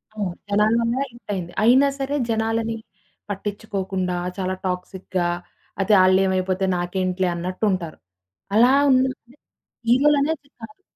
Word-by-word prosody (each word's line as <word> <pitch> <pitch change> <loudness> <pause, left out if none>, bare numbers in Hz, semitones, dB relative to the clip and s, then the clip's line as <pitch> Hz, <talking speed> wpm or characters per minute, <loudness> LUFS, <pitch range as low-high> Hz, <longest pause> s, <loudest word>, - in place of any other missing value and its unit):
అవును. 200 -4 -2 0.2
జనాల 210 +2 +3
వల్ల 230 0 0 0.2
హిట్ 235 +1 -18
అయింది. 175 -3 -4
అయినా 260 +5 +6
సరే, 275 +2 -2
జనాలని 225 0 0 0.5
పట్టిచ్చుకోకుండా 195 -3 -3 0.2
చాలా 185 0 -2
టాక్సిక్‌గా 180 0 -3 0.5
అతే 210 +2 +2
ఆళ్ళేమైపోతే 185 0 +2
నాకేంటిలే 185 +1 -1
అన్నట్టుంటారు. 185 -1 -2 0.6
అలా 240 +4 +6 0.2
ఉన్నాదే 255 -1 0 0.5
హీరోలనేది 285 +3 +3
కాదు 285 +11 -11
205 Hz, 105 wpm, -22 LUFS, 185-235 Hz, 0.6 s, అయినా